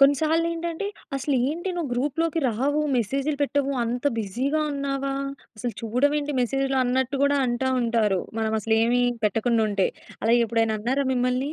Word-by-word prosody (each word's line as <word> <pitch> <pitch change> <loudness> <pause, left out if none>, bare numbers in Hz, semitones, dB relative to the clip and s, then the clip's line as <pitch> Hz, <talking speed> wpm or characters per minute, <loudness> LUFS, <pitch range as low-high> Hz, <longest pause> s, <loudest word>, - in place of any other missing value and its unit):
కొన్ని 275 +1 +6
సార్లేంటంటే 330 +3 0 0.3
అసలేంటి 280 +6 0
నువ్వు 325 -6 -2
గ్రూప్‌లోకి 295 +6 0
రావు 270 +7 0 0.2
మెసేజ్‌లు 275 +6 0
పెట్టవు 280 -1 0
అంత 245 +3 -3
బిజీగా 250 +9 -1
ఉన్నావా? 275 -1 -2 0.4
అసలు 235 +2 -3
చూడవేంటి 285 +6 +1
మెసేజ్‌లు 270 +2 0
అన్నట్టు 260 +2 0
కూడా 285 0 +3
అంటా 240 +2 0
ఉంటారు. 225 -5 +1 0.2
మనం 220 -1 0
అసలు 220 +1 +1
ఏమి 245 +1 +2 0.2
పెట్టకుండా 225 +2 +2
ఉంటే. 200 -2 +2 0.4
అలా 225 - +3
ఎప్పుడైనా 225 -1 +1
అన్నారా 260 +6 0
మిమ్మల్ని? 255 +3 0
265 Hz, 140 wpm, -25 LUFS, 235-285 Hz, 0.4 s, కొన్ని